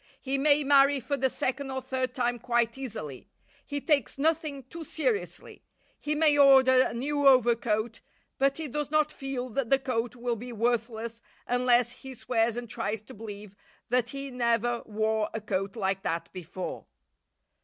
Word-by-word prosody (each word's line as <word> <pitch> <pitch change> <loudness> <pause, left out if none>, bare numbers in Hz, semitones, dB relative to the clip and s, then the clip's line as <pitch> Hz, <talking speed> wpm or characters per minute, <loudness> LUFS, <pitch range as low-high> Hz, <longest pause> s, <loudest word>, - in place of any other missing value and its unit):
He 270 0 -1
may 295 +1 +4
marry 275 0 +5
for 280 +3 -2
the 265 -1 +1
second 270 +2 -2
or 265 0 -2
third 260 -1 -3
time 245 -1 0
quite 235 -1 +1
easily. 210 - -7 0.3
He 285 - -3
takes 285 -5 +1
nothing 305 -2 0
too 330 +6 -9
seriously. 415 - -3 0.4
He 300 +1 -1
may 300 -1 +4
order 265 -2 +7
a - - 0
new 285 +3 +1
overcoat, 235 -3 +3 0.4
but 275 0 +2
he 320 -1 -4
does 290 +2 -3
not 305 0 +2
feel 270 -3 -4
that 250 0 -2
the 270 - +5
coat 245 -3 -2
will 240 -1 -2
be 245 +3 -7
worthless 230 0 -1 0.2
unless 245 -1 +3
he 260 +1 -10
swears 230 -1 0
and 240 0 -5
tries 215 -1 -3
to - - -12
believe 205 -2 -9 0.3
that 245 0 +1
he 275 +1 -6
never 235 -1 +1
wore 220 0 0
a - - -1
coat 195 -1 -3
like 195 -3 -1
that 170 -3 -3
before. 185 0 -6
245 Hz, 165 wpm, -28 LUFS, 225-275 Hz, 0.4 s, order